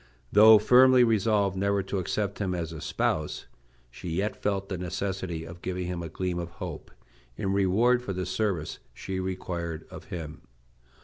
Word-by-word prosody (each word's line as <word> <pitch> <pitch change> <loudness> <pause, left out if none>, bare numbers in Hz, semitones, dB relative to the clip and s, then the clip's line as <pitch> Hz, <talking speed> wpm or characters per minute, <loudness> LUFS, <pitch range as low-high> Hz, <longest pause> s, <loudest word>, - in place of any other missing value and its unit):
Though 110 +2 +9
firmly 125 +3 +6
resolved 105 -3 +2
never 100 +1 +1
to 100 - -2
accept 100 +3 -2
him 95 -3 -1
as 85 -1 -4
a 80 - -8
spouse, 75 -1 -1 0.5
she 85 - -8
yet 95 +6 -1
felt 100 -1 -2
the 95 -3 -4
necessity 90 -2 -3
of 85 +1 -10
giving 90 0 -3
him 90 -1 -3
a 85 - -5
gleam 90 +1 -3
of 85 -1 -4
hope - - -7 0.5
in 95 -1 -1
reward 105 +6 +3
for 110 - -5
the 95 -1 -3
service 95 -8 -2 0.2
she 95 -1 -4
required 85 -3 -4
of - - -10
him. 80 -4 -7
95 Hz, 170 wpm, -27 LUFS, 85-100 Hz, 0.5 s, Though